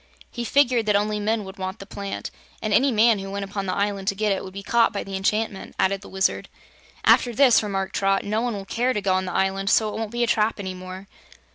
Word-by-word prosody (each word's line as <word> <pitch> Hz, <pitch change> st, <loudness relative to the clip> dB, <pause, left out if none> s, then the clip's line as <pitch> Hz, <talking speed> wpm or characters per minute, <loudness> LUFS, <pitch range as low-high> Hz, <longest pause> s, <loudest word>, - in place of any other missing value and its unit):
"He 240 Hz, -, -4 dB
figured 245 Hz, -3 st, +2 dB
that 210 Hz, -, +3 dB
only 210 Hz, +1 st, +1 dB
men 215 Hz, +1 st, 0 dB
would 190 Hz, +1 st, -10 dB
want 190 Hz, +2 st, -4 dB
the 195 Hz, -, -10 dB
plant, 200 Hz, 0 st, -6 dB, 0.3 s
and 215 Hz, -1 st, -2 dB
any 265 Hz, +6 st, +4 dB
man 225 Hz, -1 st, +4 dB
who 195 Hz, 0 st, -6 dB
went 200 Hz, 0 st, -4 dB
upon 195 Hz, 0 st, -4 dB
the 185 Hz, -, -1 dB
island 200 Hz, -1 st, -1 dB
to 200 Hz, -, +1 dB
get 210 Hz, +1 st, 0 dB
it 195 Hz, -, -1 dB
would 190 Hz, -, -8 dB
be 195 Hz, +1 st, -8 dB
caught 230 Hz, +2 st, +3 dB
by 200 Hz, -, -3 dB
the 195 Hz, -, -6 dB
enchantment," 205 Hz, +1 st, -2 dB
added 195 Hz, +1 st, +1 dB
the -, -, -12 dB
Wizard. 190 Hz, 0 st, 0 dB, 0.6 s
"After 245 Hz, -, +5 dB
this," 255 Hz, -2 st, +6 dB
remarked 195 Hz, -2 st, -3 dB
Trot, 195 Hz, 0 st, +1 dB
"no 215 Hz, +2 st, -1 dB
one 240 Hz, -2 st, -1 dB
will 195 Hz, -1 st, -6 dB
care 245 Hz, +5 st, 0 dB
to 210 Hz, -, -2 dB
go 190 Hz, -1 st, +2 dB
on 185 Hz, 0 st, 0 dB
the 180 Hz, -, -4 dB
island, 195 Hz, +1 st, 0 dB
so 215 Hz, 0 st, +3 dB
it 215 Hz, -, -5 dB
won't 225 Hz, -2 st, -3 dB
be 240 Hz, +2 st, -1 dB
a -, -, +4 dB
trap 220 Hz, -1 st, +1 dB
any 190 Hz, -2 st, -4 dB
more." 185 Hz, +1 st, -9 dB
205 Hz, 260 wpm, -24 LUFS, 195-225 Hz, 0.6 s, this